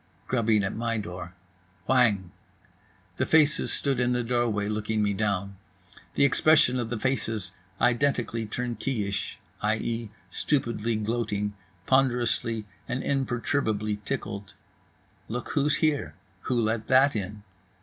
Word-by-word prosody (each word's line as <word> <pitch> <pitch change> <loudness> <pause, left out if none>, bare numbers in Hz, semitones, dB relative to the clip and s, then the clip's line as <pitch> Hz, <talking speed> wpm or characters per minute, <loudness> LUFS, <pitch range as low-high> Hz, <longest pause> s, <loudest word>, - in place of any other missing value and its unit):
Grubbing 115 -4 +2
at 100 - -2
my 115 0 -1
door. 90 -3 -6 0.5
Whang! 110 -8 +3 0.9
The - - +1
faces 155 -1 +4
stood 135 -3 0
in 125 0 +2
the 125 0 0
doorway, 115 -4 0
looking 105 0 0
me 100 -1 +1
down. 100 -1 -1 0.6
The - - +5
expression 140 -2 +4
of 115 -2 -2
the 120 - -2
faces 110 -6 0 0.3
identically 120 -2 +1
turnkeyish, 115 -3 -2 0.2
i.e., 110 +1 -1 0.2
stupidly 115 -5 0
gloating, 105 -2 -1 0.3
ponderously 120 -4 +2 0.2
and 130 - -2
imperturbably 120 -5 0
tickled. 100 -1 -4 0.7
Look 120 +2 -4
who's 145 -1 +2
here, 145 - 0 0.3
who 125 -2 +2
let 110 0 0
that 135 +1 +5
in? 105 0 -4
115 Hz, 120 wpm, -27 LUFS, 105-125 Hz, 0.9 s, The